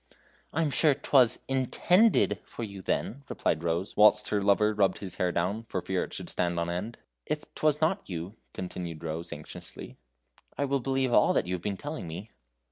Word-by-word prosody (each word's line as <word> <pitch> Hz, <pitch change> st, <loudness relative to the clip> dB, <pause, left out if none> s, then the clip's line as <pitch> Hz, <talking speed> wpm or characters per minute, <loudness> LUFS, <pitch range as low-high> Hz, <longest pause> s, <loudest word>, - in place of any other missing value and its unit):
"I 165 Hz, -, +1 dB
am 150 Hz, -, 0 dB
sure 150 Hz, 0 st, +4 dB
'twas 130 Hz, -4 st, +3 dB
INTENDED 135 Hz, -, +3 dB
for 120 Hz, -, -7 dB
you, 100 Hz, -3 st, -7 dB
then," 135 Hz, +8 st, -2 dB
replied 80 Hz, -, -1 dB
Rose, 85 Hz, +3 st, -1 dB
whilst 105 Hz, 0 st, +5 dB
her 105 Hz, -, +1 dB
lover 105 Hz, +2 st, +3 dB
rubbed 100 Hz, -3 st, +2 dB
his 95 Hz, -3 st, -7 dB
hair 90 Hz, -1 st, +1 dB
down, 95 Hz, +6 st, -1 dB
for -, -, -3 dB
fear -, -, -1 dB
it -, -, -15 dB
should -, -, -6 dB
stand 85 Hz, -1 st, 0 dB
on 85 Hz, 0 st, -1 dB
end. 105 Hz, +7 st, -4 dB, 0.3 s
"If 150 Hz, 0 st, -2 dB
'twas 155 Hz, 0 st, +1 dB
not 180 Hz, -, +1 dB
you," 90 Hz, +3 st, -5 dB, 0.2 s
continued 85 Hz, -3 st, -6 dB
Rose, 80 Hz, +1 st, -4 dB
anxiously, -, -, -9 dB, 0.6 s
"I 140 Hz, -, +1 dB
will 140 Hz, 0 st, +1 dB
believe 130 Hz, -1 st, 0 dB
all -, -, +5 dB
that -, -, +1 dB
you 90 Hz, -, -3 dB
have 90 Hz, -, -3 dB
been 100 Hz, 0 st, -3 dB
telling 145 Hz, -, -5 dB
me." 90 Hz, +7 st, -7 dB
105 Hz, 195 wpm, -29 LUFS, 90-135 Hz, 0.6 s, whilst